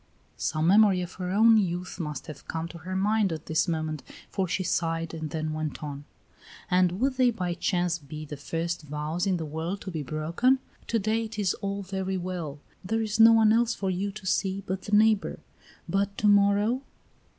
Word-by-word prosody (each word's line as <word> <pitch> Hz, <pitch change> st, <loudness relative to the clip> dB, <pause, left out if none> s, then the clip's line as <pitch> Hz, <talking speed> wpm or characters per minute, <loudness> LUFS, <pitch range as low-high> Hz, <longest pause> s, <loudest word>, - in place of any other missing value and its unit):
Some 155 Hz, 0 st, -1 dB
memory 195 Hz, 0 st, +5 dB
of 180 Hz, -, -7 dB
her 180 Hz, -, -2 dB
own 220 Hz, +4 st, +6 dB
youth 180 Hz, -2 st, -1 dB
must 150 Hz, -4 st, -4 dB
have 155 Hz, -4 st, -10 dB
come 165 Hz, 0 st, -3 dB
to 170 Hz, -, -10 dB
her 185 Hz, +3 st, -5 dB
mind 205 Hz, 0 st, +2 dB
at 160 Hz, -1 st, -5 dB
this 160 Hz, +3 st, +1 dB
moment, 155 Hz, -3 st, -2 dB, 0.3 s
for 190 Hz, -2 st, 0 dB
she 185 Hz, +2 st, -1 dB
sighed 165 Hz, -1 st, -1 dB
and 160 Hz, -1 st, -4 dB
then 155 Hz, -1 st, -3 dB
went 155 Hz, 0 st, -4 dB
on: 145 Hz, -1 st, -6 dB, 0.7 s
"And 180 Hz, 0 st, +3 dB
would 260 Hz, +1 st, +1 dB
they 255 Hz, -1 st, +5 dB
by 180 Hz, -6 st, -2 dB
chance 175 Hz, -1 st, 0 dB
be 155 Hz, +1 st, -8 dB
the 150 Hz, -, -7 dB
first 165 Hz, +4 st, -3 dB
vows 150 Hz, +5 st, -3 dB
in 185 Hz, -2 st, +2 dB
the 160 Hz, -, -4 dB
world 160 Hz, +6 st, -3 dB
to 190 Hz, -, -6 dB
be 160 Hz, -3 st, -3 dB
broken? 160 Hz, -, +1 dB, 0.3 s
To 230 Hz, -, +1 dB
day 220 Hz, +2 st, 0 dB
it 220 Hz, 0 st, -8 dB
is 200 Hz, -4 st, +1 dB
all 200 Hz, 0 st, -4 dB
very 190 Hz, 0 st, -2 dB
well; 175 Hz, -5 st, -4 dB, 0.3 s
there 225 Hz, +4 st, 0 dB
is 215 Hz, 0 st, -2 dB
no 225 Hz, 0 st, +9 dB
one 220 Hz, -1 st, +5 dB
else 235 Hz, +1 st, +2 dB
for 195 Hz, -1 st, -1 dB
you 195 Hz, +3 st, -2 dB
to 210 Hz, -2 st, -10 dB
see 190 Hz, +1 st, 0 dB
but 190 Hz, 0 st, -3 dB
the 205 Hz, +1 st, +2 dB
neighbor; 215 Hz, -1 st, +3 dB, 0.5 s
but 200 Hz, 0 st, 0 dB
to 210 Hz, -, +2 dB
morrow?" 205 Hz, +4 st, +4 dB
185 Hz, 205 wpm, -27 LUFS, 160-205 Hz, 0.7 s, no